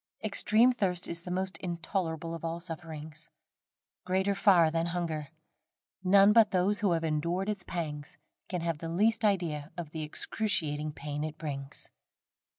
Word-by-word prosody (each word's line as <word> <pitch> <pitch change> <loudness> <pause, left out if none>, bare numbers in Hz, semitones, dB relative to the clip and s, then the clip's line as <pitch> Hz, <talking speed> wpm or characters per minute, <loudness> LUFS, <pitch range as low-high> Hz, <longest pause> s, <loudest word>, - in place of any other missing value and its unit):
Extreme 215 +3 +4
thirst 185 -7 -1
is 170 0 -3
the 180 - -8
most 185 +1 -2
intolerable 170 -2 -3
of 165 - -7
all 165 0 -2
sufferings 160 -2 -8 0.7
greater 190 +2 +1
far 190 -5 +5
than 165 +1 0
hunger. 165 -4 -2 0.8
None 195 +2 +6
but 225 -2 +6
those 195 +2 +2
who 200 -4 +2
have 165 -1 0
endured 170 +5 0
its 210 -3 -2
pangs, 150 -5 -5 0.3
can 180 -2 -2
have 165 -2 -2
the 165 - -5
least 215 +6 +2
idea 170 -8 0
of 165 -4 -5
the 160 - -5
excruciating 155 -2 -2
pain 145 0 -4
it 155 0 -5
brings. 140 -3 -6
170 Hz, 155 wpm, -30 LUFS, 155-190 Hz, 0.8 s, None